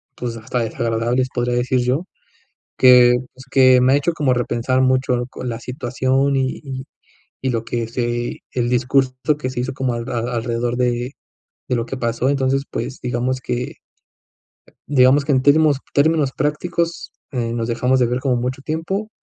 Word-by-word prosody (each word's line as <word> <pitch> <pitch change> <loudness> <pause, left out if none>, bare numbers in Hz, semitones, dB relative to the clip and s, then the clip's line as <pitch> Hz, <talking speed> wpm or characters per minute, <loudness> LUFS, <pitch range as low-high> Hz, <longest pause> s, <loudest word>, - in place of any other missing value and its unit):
pues, 120 -2 -4
hasta 115 +2 -3
desagradables, 115 +3 0
podría 120 0 0
decir 125 +1 +1
yo, 130 +8 0 0.7
que, 125 -1 +7 0.2
pues, 130 +1 -14
que 130 -2 +6
me 130 +2 +4
ha - - +5
hecho 165 +4 0
como 145 -6 +1
repensar 125 +1 0
mucho 130 -1 +2
lo 120 +1 -3
co 130 - -9
la 115 -1 -3
situación 130 +2 0
y 130 -1 -1
y 130 -1 -6 0.6
y 130 - -1
lo 115 -1 -1
que 115 -2 -2
se 120 0 -2
el 120 -1 0
discurso 130 +1 +2 0.3
que 130 - -2
se 125 - -4
hizo 130 +1 -3
como 130 -2 -1
al 115 0 -5
a 120 - -2 0.2
alrededor 120 +1 -1
de 125 +1 0 0.6
de 125 - +1
lo 115 0 -2
que 135 - -5
pasó. 120 +1 0
Entonces, 135 0 +1
pues, 130 - -5
digamos 125 +1 -1
que 125 0 -4 1.1
digamos 135 +1 +5
que 145 - -1
en 130 - +3
términos 145 +1 +4 0.2
términos 145 -2 +3
prácticos, 165 +3 -2 0.2
eh, 115 -3 -2
nos 115 -1 -2
dejamos 125 +2 +1
de 125 - +4
ver 125 +2 -1
como 130 -2 +1
mucho 125 +2 -3
tiempo, 175 +8 -3
130 Hz, 180 wpm, -20 LUFS, 120-135 Hz, 1.1 s, que